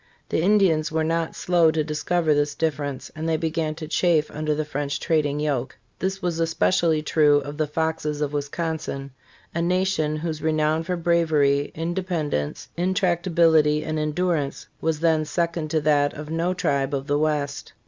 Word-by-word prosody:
The - - +1
Indians 180 -5 +3
were 160 0 0
not 165 0 -1
slow 175 -2 +3
to 155 -1 0
discover 155 +2 0
this 145 0 0
difference, 145 -4 -2
and 160 +1 -3
they 160 - +2
began 160 -1 -2
to 160 -1 -7
chafe 160 -2 +2
under 155 0 -1
the 155 0 -2
French 145 -1 -3
trading 150 -3 0
yoke. 140 -4 -2 0.2
This 190 +1 -2
was 170 -2 -1
especi 160 - +2
ally 160 -2 +2
true 150 -2 +4
of 145 +1 -7
the 155 -1 0
Foxes 155 -1 -2
of 150 -1 -2
Wisconsin, 145 -1 -3 0.4
a 170 - -1
nation 180 -3 +1
whose 155 0 -4
renown 155 0 +1
for 180 +2 -2
bravery, 155 -4 +2
in 165 +2 -2
dependence, 160 - -2
intractability 170 -4 +2
and 155 0 -2
endurance 155 -2 -1 0.2
was 160 -1 -1
then 160 -2 +3
second 170 0 -2
to 155 0 +1
that 145 -1 +2
of 150 +1 -7
no 170 +3 0
tribe 140 -5 0
of 135 0 -3
the 145 +1 +1
West. 150 -2 -1
155 Hz, 170 wpm, -24 LUFS, 150-165 Hz, 0.4 s, true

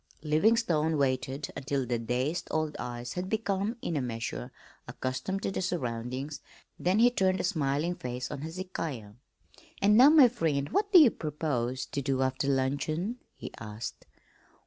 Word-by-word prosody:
Livingstone 160 -1 +2
waited 130 +1 -1
until 140 -1 -2
the 120 -1 -1
dazed 125 +8 -1
old 155 -1 -1
eyes 120 0 -5
had 180 +1 -4
become 215 +1 -1
in 165 - -2
a 145 - +1
measure 115 - -4 0.4
accustomed 190 +10 -3
to - - -1
the - - -2
surroundings, 130 -4 -3 0.4
then 185 +3 +2
he 240 +2 +6
turned 190 -5 +1
a - - -1
smiling 155 -2 0
face 125 -5 -5
on 140 - -5
Hezekiah. 160 - -5 0.7
"And 205 +1 +4
now, 260 +4 +9
my 300 -4 +8
friend, 155 - -1
what 405 - 0
do 380 - +9
you 295 -9 +8
propose 130 -5 -2
to 140 - -4
do 135 0 0
after 130 +1 -1
luncheon?" 145 - 0 0.2
he - - -8
asked. 105 +2 -7
150 Hz, 155 wpm, -29 LUFS, 130-185 Hz, 0.7 s, now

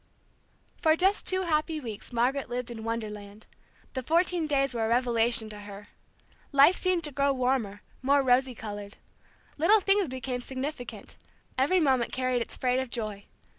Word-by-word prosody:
For 315 0 +3
just 380 +4 +2
two 375 0 +1
happy 315 -1 0
weeks 225 -6 -8
Margaret 250 +3 0
lived 245 0 -3
in 225 -2 -7
Wonderland. 210 -2 -5 0.5
The 260 - -2
fourteen 335 +3 +1
days 275 -2 +1
were 230 -2 -1
a - - -1
revelation 235 -2 +2
to 210 - -9
her. 205 0 -10 0.6
Life 280 +6 +6
seemed 365 -2 +1
to 300 - -5
grow 280 +1 +2
warmer, 250 -6 -1 0.2
more 280 +2 +3
rosy 255 0 +3
colored. 205 -2 -7 0.6
Little 405 +8 +5
things 390 -1 +2
became 255 -1 -4
significant; 265 0 -6 0.4
every 285 +8 +3
moment 265 -6 +2
carried 255 -1 0
its - - -5
freight 250 0 +1
of 260 -1 -3
joy. 215 -4 -4
255 Hz, 160 wpm, -28 LUFS, 230-300 Hz, 0.6 s, Life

